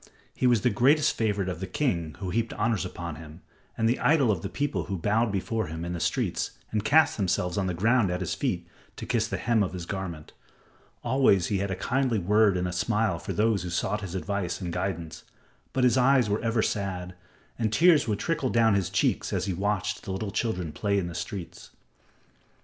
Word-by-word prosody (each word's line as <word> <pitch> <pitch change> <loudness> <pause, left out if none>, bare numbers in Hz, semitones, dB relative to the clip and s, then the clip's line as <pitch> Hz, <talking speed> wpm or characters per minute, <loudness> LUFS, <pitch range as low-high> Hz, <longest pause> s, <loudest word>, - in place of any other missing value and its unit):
He 125 - +1
was 120 -4 +4
the 125 - +2
greatest 140 +8 +3
favorite 105 -4 0
of 90 -3 -4
the 95 - -4
king 90 - -1
who 95 -1 -4
heaped 115 +2 -1
honors 110 -2 0
upon 85 -3 -6
him, 80 +2 -11 0.4
and 115 - +2
the 120 - +1
idol 145 -7 +4
of 90 -5 -1
the 100 - -4
people 145 +5 -2
who 100 -2 -3
bowed 105 +6 +1
before 110 +3 -2
him 80 +2 -5
in 85 - -3
the 85 - -4
streets - - -1
and 105 -1 -1
cast 155 +9 +4
themselves 90 -3 0
on 95 -2 0
the 90 - -2
ground 110 +3 +3
at 90 0 -2
his 90 - -2
feet - - -2 0.3
to - - -7
kiss - - 0
the - - -3
hem 115 -2 +1
of 95 -3 -1
his 90 -2 -5
garment. 90 -5 -6 0.7
Always 120 -8 +3
he 100 - +1
had 100 +1 -2
a 95 - -1
kindly 125 +4 0
word 105 +1 +3
and 90 0 -1
a - - -3
smile 105 -1 0
for - - -5
those 110 -1 +2
who 90 - -5
sought 95 +4 -1
his 95 -2 -6
advice 95 -2 -2
and 90 -3 -4
guidance, 85 -3 -4 0.5
but 130 - 0
his 125 +1 +4
eyes 125 -4 +4
were 105 - 0
ever 115 -1 +1
sad, 90 -3 -3 0.5
and 110 -2 0
tears 160 +2 +5
would 105 -2 0
trickle 150 - -1
down 115 -2 +4
his 95 -3 +1
cheeks 100 +1 0
as - - -1
he 95 - -1
watched 105 +2 -1
the 95 - -6
little 100 +2 -3
children 90 -8 -2
at - - -10
play 100 -1 0
in 95 - 0
the - - -7
streets. 85 +1 -6
100 Hz, 220 wpm, -27 LUFS, 90-115 Hz, 0.7 s, tears